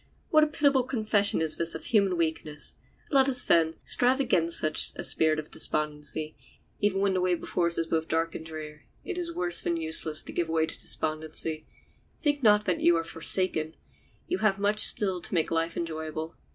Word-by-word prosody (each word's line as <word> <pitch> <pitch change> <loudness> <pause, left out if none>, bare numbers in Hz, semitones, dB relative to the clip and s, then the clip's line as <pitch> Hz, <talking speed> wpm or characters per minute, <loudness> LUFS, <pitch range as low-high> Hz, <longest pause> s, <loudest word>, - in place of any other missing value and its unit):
What 310 -2 +5
a - - +2
pitiable 285 -3 +1
confession 215 -7 0
is 155 -1 0
this 170 0 -1
of - - -8
human 200 -5 +1
weakness! 160 -2 -3 0.4
Let 275 -2 +3
us, 250 -2 0
then, 165 -1 +1
strive 255 +2 +1
against 170 -11 +2
such 155 0 0
a - - -7
spirit 155 -1 0
of 155 0 -7
despondency. 150 +1 -3 0.4
Even 200 -2 0
when 200 -1 +1
the 185 - -1
way 180 -1 +1
before 170 0 -2
us 170 - -1
is 165 - -1
both 160 0 -2
dark 165 +1 -2
and - - -8
dreary 155 -2 -10 0.2
it 390 - -4
still 360 - -5
is 340 -1 -7
worse 175 -1 +2
than 170 - -2
useless 160 -1 +3
to - - -9
give 170 -2 -3
way 160 -1 0
to 160 - -7
despondency. 155 0 -3 0.5
Think 290 -3 -1
not 210 -3 +3
that 180 -3 -2
you 170 0 +3
are 165 - -2
forsaken; 165 -1 0 0.5
you 365 - -3
have 210 -3 +1
much 205 +1 -1
still 190 -4 +8
to - - -6
make 160 - -1
life 165 0 -2
enjoyable. 160 -1 -6
170 Hz, 200 wpm, -26 LUFS, 160-210 Hz, 0.5 s, still